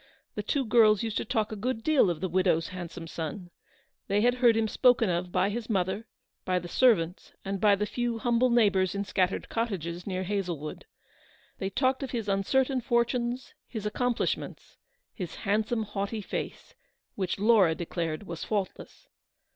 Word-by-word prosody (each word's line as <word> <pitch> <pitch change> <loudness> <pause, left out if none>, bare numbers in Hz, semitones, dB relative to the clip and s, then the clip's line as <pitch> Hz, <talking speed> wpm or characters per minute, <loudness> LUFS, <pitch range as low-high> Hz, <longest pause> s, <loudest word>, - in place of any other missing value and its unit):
The 210 - -3
two 265 +6 -1
girls 215 -2 +5
used 225 -2 -2
to - - -2
talk 220 -4 0
a - - -3
good 225 +2 -3
deal 300 -11 +4
of 165 -2 -3
the 185 - 0
widow's 180 -2 +1
handsome 175 -2 -7
son. 165 +2 -6 0.6
They 200 +1 +2
had 245 +2 +4
heard 235 -3 +6
him 225 -1 +2
spoken 240 -3 +3
of 175 +1 -2
by 200 - +2
his 230 +1 -5
mother, 195 +2 -1 0.4
by 185 -1 0
the 175 -1 -4
ser 250 +5 +5
vants, 165 +1 -6
and 195 0 -3
by 205 -2 +6
the 210 +1 -1
few 240 +1 -2
humble 240 +2 +2
neighbours 200 -6 +3
in 200 0 -2
scat 185 -2 +2
tered - - -5
cottages 180 -7 -3
near 185 -1 -2
Hazlewood. 180 -6 -3 0.7
They 190 - -2
talked 260 +6 +1
of 270 - -3
his 230 -4 -3
uncertain 255 +7 +1
fortunes, 240 +1 0
his 220 -4 -6
accomplishments, 245 +3 -2 0.4
his 180 -6 -6
handsome, 220 +3 0
haughty 205 +1 -3
face, - - -5 0.4
which 185 -3 -2
Laura 200 -5 +4
declared 165 0 -3
was 170 -4 -6
faultless. 210 - -4
205 Hz, 170 wpm, -28 LUFS, 185-235 Hz, 0.7 s, heard